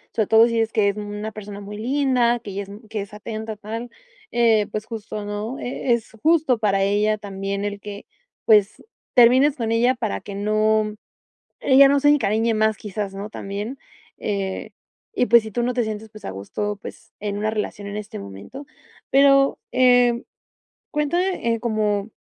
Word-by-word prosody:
Sobre 220 -3 +1
todo, 225 +1 +6
si 230 - -3
dices 225 -1 +1
que 210 -2 +2
es 200 - -2
una 210 +1 -5
persona 205 -1 -8
muy 205 +1 -8
linda, 245 -1 +1
que 205 -4 -8
ya 200 - -3
es 195 - -13 0.2
que 215 -2 -3
es 200 - -9
atenta, 220 0 -6
tal, 225 +3 -6 0.4
eh, 225 -3 +3
pues 215 0 -4
justo, 215 -2 -6
¿no?, 210 +5 -4
eh, 245 +1 -3
es 235 -2 0
justo 315 -6 +3
para 195 -3 +1
ella 210 +2 +2
también, 200 0 -4
el 205 -1 -4
que, 205 0 -8 0.4
pues, 210 -3 +4 0.3
termines 260 +4 +5
con 230 -1 -1
ella 245 +3 +3
para 100 - -3
que 200 - -8
no 215 +1 +1 0.6
ella 275 +1 +6
no 280 0 +3
se 290 - +2
encariñe 230 -6 +3
más, 215 -1 +1
quizás, 205 -1 -5
¿no?, 200 +2 -6
también. 205 +6 -5 0.4
Eh, 195 -2 -3 0.4
y, 250 - +2
pues, 235 -1 +6
si 220 - -8
tú 240 - -1
no 250 +1 0
te 245 - +2
sientes, 220 0 -5
pues, 215 -1 -13
a - - -4
gusto, 205 - -4
pues, 225 - -11
en 205 0 -3
una 215 +1 -1
relación, 205 -1 -4
en 205 - -5
este 210 0 -7
momento. 100 - -9 0.5
Pero, 275 0 +5
eh, 245 -1 +4 0.7
cuéntame 300 -6 0
cómo, 215 -2 0
215 Hz, 180 wpm, -22 LUFS, 205-240 Hz, 0.7 s, todo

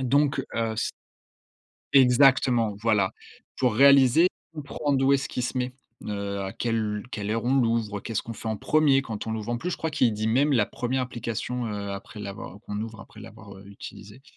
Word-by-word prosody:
Donc 140 +2 +2 0.2
heu 115 -1 0
s 110 - -2 1.0
Exactement, 125 -4 +5
voilà, 105 -4 +2 0.5
pour 125 -4 +1
réaliser, 140 +5 +6 0.3
comprendre 145 -2 -1
où 135 - +4
est-ce 135 -1 +1
qu'il 125 - -3
se 120 +2 -2
met, 125 0 -2 0.3
heu, 100 -1 -3
à 95 0 -4
quelle 110 -3 -1
quelle 105 -4 -4
heure 115 +1 -1
on 130 +2 +2
l'ouvre, 115 -4 +1
heu, - - -10
qu'est-ce 110 +2 -3
qu'on 115 - -7
fait 115 - -9
en 110 - -1
1er 145 +1 +3
quand 110 -5 -6
on 110 - -2
l'ouvre. 110 0 -4
En 120 - -1
plus, 180 - -3
je - - -2
crois 160 - -3
qu'il 135 -6 +2
dit 110 +1 -2
même 140 +6 +3
la 115 -6 +3
1re 125 +2 -2
application 120 0 -4
après, 100 0 -6
heu, - - -6
l'avoir 100 0 -8
qu'on 105 -2 -5
ouvre 110 0 -6
après - - -15
l'avoir 105 -3 -12
utilisé. 105 +3 -11
115 Hz, 195 wpm, -26 LUFS, 105-130 Hz, 1.0 s, réaliser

